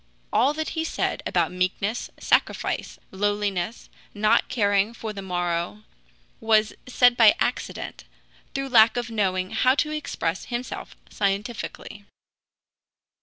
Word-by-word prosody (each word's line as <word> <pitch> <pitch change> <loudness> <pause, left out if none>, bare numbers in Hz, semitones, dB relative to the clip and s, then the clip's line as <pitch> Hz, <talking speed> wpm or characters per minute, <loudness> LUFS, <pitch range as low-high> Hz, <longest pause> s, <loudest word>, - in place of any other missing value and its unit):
All 260 +7 +3
that 315 0 -2
he 320 - -2
said 325 - -2
about - - +1
meekness, 185 +5 -1
sacrifice, - - 0
lowliness, 205 0 -1 0.3
not 215 +1 +3
caring 205 -1 +1
for 220 -2 -5
the 200 - -6
morrow, 175 +2 -2 0.6
was 220 -1 +3
said 245 -1 +4
by 225 -3 +7
accident, - - -3 0.5
through 275 0 -2
lack 230 -1 +6
of 240 -1 -3
knowing 185 -3 0
how 255 +1 +3
to 300 +1 0
express 195 - -3
himself 245 0 -5 0.2
scientifically. 205 0 -3
215 Hz, 120 wpm, -25 LUFS, 195-240 Hz, 0.6 s, by